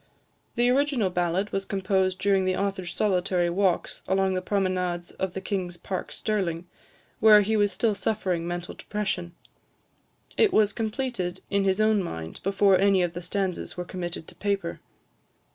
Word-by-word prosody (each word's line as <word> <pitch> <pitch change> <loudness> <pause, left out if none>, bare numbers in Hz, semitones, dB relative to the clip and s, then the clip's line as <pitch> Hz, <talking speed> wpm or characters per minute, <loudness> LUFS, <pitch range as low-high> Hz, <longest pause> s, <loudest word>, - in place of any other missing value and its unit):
The 240 +1 +3
original 265 -7 +2
ballad 180 +3 0
was 195 - -1
composed 190 -1 0
during 195 -1 +2
the 185 0 +1
author's 195 -3 -2
solitary 180 -3 +1
walks 185 -1 0
along 190 0 +2
the 185 - -1
promenades 185 -3 -1
of 190 -2 -3
the 190 - -4
King's 185 -4 -3
Park, 185 0 -5
Stirling, 180 -6 -2 0.5
while 210 -1 +7
he 220 +2 0
was 205 -1 +3
still 220 +3 +1
suffering 185 -5 -1
mental 175 0 -4
depression. 190 -5 -3 1.0
It 435 -3 +5
was 210 - +3
completed 220 -5 -3
in 200 -1 +2
his 190 +1 +2
own 215 -1 +3
mind 80 - -6
before 195 -1 +3
any 195 -2 +4
of 175 -1 -1
the 175 - -5
stanzas 185 +1 -3
were 180 - -3
committed 175 -3 -5
to - - -11
paper. 200 -4 -2
190 Hz, 160 wpm, -26 LUFS, 180-205 Hz, 1.0 s, while